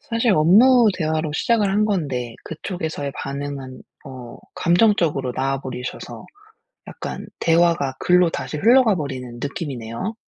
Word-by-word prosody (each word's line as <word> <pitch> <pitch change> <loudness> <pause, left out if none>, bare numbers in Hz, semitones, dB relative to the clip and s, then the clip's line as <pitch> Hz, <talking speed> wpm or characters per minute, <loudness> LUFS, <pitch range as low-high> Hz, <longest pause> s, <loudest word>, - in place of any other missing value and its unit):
사실 230 -1 0
업무 220 +9 +5
대화로 155 -2 -2
시작을 210 +3 +1
한 210 +2 +2
건데 135 - -2
그쪽에서의 160 -3 -5
반응은 140 -2 -6 0.2
어 130 -3 -10 0.2
감정적으로 170 - +2
나와 135 +2 -2
버리셔서 125 -1 -7 0.6
약간 - - -7
대화가 165 -5 +2
글로 180 -1 +3
다시 155 - -5
흘러가 230 - +4
버리는 130 -6 -5
느낌이네요. 140 - -5
155 Hz, 310 characters per minute, -21 LUFS, 135-195 Hz, 0.6 s, 업무